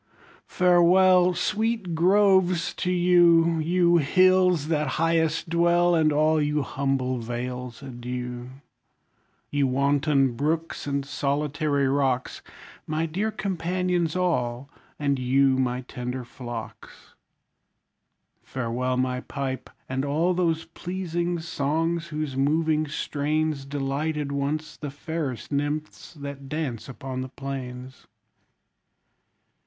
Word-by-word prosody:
Farewell! 180 0 +5
Sweet 215 0 -1
groves, 185 0 +3
to 180 - -2
you! 170 -2 +4
You 175 +2 +3
hills, 180 0 +3
that 150 -2 +1
highest 165 0 +1
dwell; 175 +1 +3
And 160 -2 +3
all 155 +1 +3
you 150 0 0
humble 130 -2 -1
vales, 125 +2 -5
adieu! 125 -1 -6 1.0
You 145 -1 +2
wanton 140 0 +2
brooks, 160 +4 -2
and 140 -1 -1
solitary 145 0 0
rocks, 135 -2 0 0.5
My 155 +1 -1
dear 190 +7 -1
companions 180 -4 -1
all! 140 -7 -1 0.3
and 140 -2 0
you, 130 +1 +3
my 125 -1 0
tender 125 0 -5
flocks! 120 -2 -9 1.3
Farewell 125 0 -2
my 125 0 0
pipe, 135 -1 -5 0.2
and 130 +1 -2
all 155 +6 +1
those 165 -3 0
pleasing 175 0 -3
songs, 165 +1 -1
whose 155 -4 -4
moving 155 +3 +1
strains 150 0 -1
Delighted 145 +1 -2
once 150 +2 -2
the 145 - -5
fairest 145 -3 -5
nymphs 145 +3 -3
that 140 -2 -8
dance 140 -7 -4
upon 130 0 -5
the 130 - -5
plains! 130 -1 -7
150 Hz, 105 wpm, -25 LUFS, 135-170 Hz, 1.3 s, Farewell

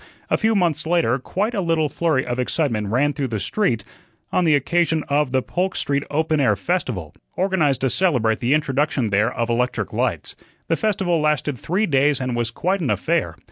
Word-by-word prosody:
A - - +4
few 220 0 +2
months 165 -5 0
later 165 -7 +2
quite 205 - -2
a 200 - -1
little 165 -3 +1
flurry 150 -2 0
of 120 +1 -3
excitement 125 -5 -1
ran 135 +7 +1
through 140 -3 -2
the 110 -3 -3
street 120 - 0 0.5
on 180 - +2
the 155 -2 +5
occasion 160 +2 +1
of 145 -2 +1
"The 130 -1 +1
Polk 185 +2 -2
Street 140 0 -1
Open 155 +1 0
Air 110 -7 +3
Festival," 120 - -2 0.2
organized 175 -8 +1
to 130 - +2
celebrate 125 -12 +2
the 125 +4 +2
introduction 140 -5 0
there 105 +4 +2
of 115 - -2
electric 125 +2 -1
lights. - - -2 0.3
The 165 - +3
festival 185 -5 0
lasted 150 -2 0
three 190 +6 0
days 140 -4 +2
and 130 -2 -2
was 120 -1 0
quite 185 +11 -1
an 150 - -1
affair. 105 - 0
145 Hz, 190 wpm, -21 LUFS, 125-170 Hz, 0.5 s, the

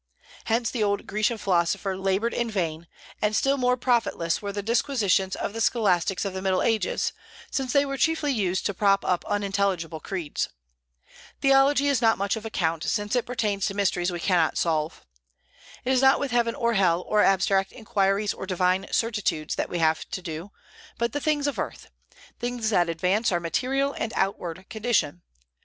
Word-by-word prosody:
Hence 230 +1 0
the 240 - -3
old 200 -1 0
Grecian 215 +3 0
philosopher 190 0 0
labored 195 +4 0
in 235 -1 -1
vain; 170 -5 -3 0.3
and 210 0 +1
still 275 +4 +2
more 250 -2 +1
profitless 235 -9 0
were 200 -1 -4
the 205 0 -4
disquisitions 210 -5 +1
of 200 - -4
the 225 - -4
scholastics 195 -5 +1
of 195 - -3
the 190 - -4
Middle 190 -1 +1
Ages, 230 - 0 0.4
since 265 -2 -1
they 280 +1 +4
were 275 0 -3
chiefly 320 -1 +1
used 190 -5 -1
to 200 - 0
prop 195 0 +2
up 180 -1 +1
unintelligible 195 -5 -1
creeds. 170 -4 -3 0.9
Theology 275 +1 +4
is 275 -4 +2
not 225 -1 +5
of - - -8
much 200 +2 0
account, 170 -7 -2
since 205 +3 -1
it 245 - 0
pertains 210 -5 -1
to 195 - -4
mysteries 180 -3 +1
we 175 - -4
cannot 170 -3 +2
solve. 160 -1 -1 0.8
It 260 - +1
is 255 - +3
not 265 0 +5
with 280 -2 -2
heaven 235 -1 +1
or 235 0 +1
hell, 180 -4 +3
or 210 0 +2
abstract 195 0 +2
inquiries, 205 -3 0
or 190 - -7
divine 185 +1 +1
certitudes, 210 -9 0
that - - -2
we 175 - -3
have 160 -1 +1
to 185 - -4
do, 165 +3 -6 0.5
but 235 -1 -1
the 290 - -2
things 295 -1 +1
of 285 - -2
earth, - - -5 0.5
things 240 -2 -2
that 175 -4 +3
advance 185 +7 +1
our 175 - +1
material 270 +11 0
and 225 - -3
outward 185 -2 -2
condition. 215 -8 0
205 Hz, 180 wpm, -25 LUFS, 185-235 Hz, 0.9 s, not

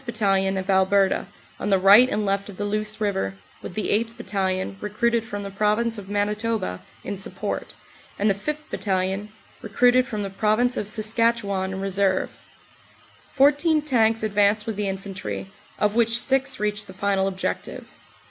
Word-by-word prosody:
Battalion, 195 -5 +1
of 190 0 -4
Alberta, 190 0 +2 0.3
on - - -2
the 195 - +4
right 200 +7 +7
and 210 -3 -1
left 200 +1 -1
of 195 - -10
the 205 - -2
Luce 215 +1 -2
river, 190 - -1 0.3
with 175 - -8
the 215 - -2
8th. 230 +2 0
Battalion, 190 -4 -2
recruited 230 +2 0
from 205 -2 -5
the 200 - -6
Prov 210 +2 +1
ince 235 -2 -1
of 195 -1 -11
Manitoba, 210 - -1 0.2
in 200 -2 -5
support, 195 - -4 0.4
and 205 - +1
the 200 - +4
5th. 300 +10 -5
Battalion, 190 +1 -1 0.3
recruited 245 +4 +3
from 210 -2 -3
the 195 - -5
Province 215 +5 +1
of 205 - -3
Saskatchewan, 215 -3 +1
in 190 0 -5
reserve. 195 -1 0 1.0
Fourteen 295 +3 +4
tanks 225 -6 +2
advanced 210 0 +2
with 225 - -3
the 205 0 -2
infantry, 195 0 -6 0.3
of 210 0 +1
which 230 0 +3
six 270 +2 0
reached 210 0 -1
the 190 - -10
final 195 0 0
objective. 190 -1 -4
205 Hz, 165 wpm, -24 LUFS, 195-230 Hz, 1.0 s, right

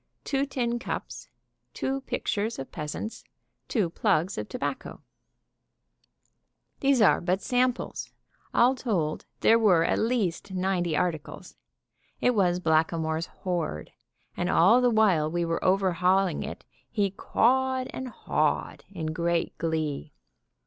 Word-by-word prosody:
Two 275 0 0
tin 240 -3 -1
cups. - - -6 0.5
Two 270 +1 -2
pictures 220 -3 -2
of 135 - -7
peasants. 155 +9 -5 0.4
Two 210 -8 +1
plugs 185 0 +1
of - - -5
tobacco. - - -5 1.8
These 270 -4 +4
are 200 - +5
but 185 +2 0
samples. 250 0 -1 0.4
All 245 +2 +4
told, 185 -12 -2
there 230 +1 +5
were 180 -7 +4
at; - - +1
least 220 -8 0
ninety 180 -4 0
articles. 165 -4 -3 0.6
It 250 - +3
was 180 -5 +2
Blackamoor's 160 0 +1
hoard; 170 - -4 0.4
and 175 - -1
all 205 +8 +5
the 250 - +4
while 200 -9 +3
we 170 +1 -1
were 165 0 -2
overhauling 185 0 +2
it - - -7 0.2
he 205 -4 0
cawed 260 +5 +1
and 260 - -5
hawed 245 - -1
in 160 -5 -4
great 170 0 -1
glee! 160 -3 -2
185 Hz, 120 wpm, -27 LUFS, 165-235 Hz, 1.8 s, are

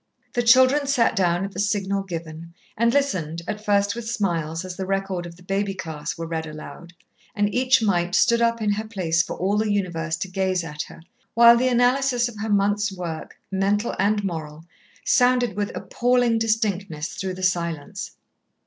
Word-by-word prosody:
The 240 - +1
children 260 +4 +5
sat 250 -5 +2
down 180 -1 +1
at 200 - -6
the 190 - -7
signal 200 -1 0
given, 170 -2 -7 0.2
and 235 +1 +2
listened, 175 - -1
at 210 0 -4
first 205 0 +2
with 235 -1 -5
smiles 170 -6 -2
as 185 -1 -6
the 190 0 -5
record 195 -2 -2
of 170 - -11
the 180 - -18
baby 195 +1 -1
class 160 -4 -5
were 165 - -4
read 160 -1 -4
aloud 155 +3 -10 0.4
and 205 -1 0
each 255 -1 +3
mite 180 -3 +1
stood 235 +1 +4
up 230 -1 +1
in 210 - +2
her 215 +2 -2
place 175 -6 +1
for - - -5
all 195 +3 0
the 215 -1 0
universe 165 -5 -1
to 190 - -4
gaze 185 -1 -1
at 150 -2 -5
her, - - -14 0.3
while 235 0 +8
the 250 +2 +2
analysis 245 0 +2
of 225 -4 -9
her 220 +1 -3
month's 205 0 +2
work, 175 -4 -6
mental 200 +3 0
and 205 +1 +2
moral, 160 -4 -5 0.4
sounded 250 -2 +3
with 205 0 -2
appalling 245 -2 +1
distinctness 200 -8 -1
through 190 -1 -4
the 185 - -8
silence. 170 -5 -2
195 Hz, 185 wpm, -23 LUFS, 175-230 Hz, 0.4 s, while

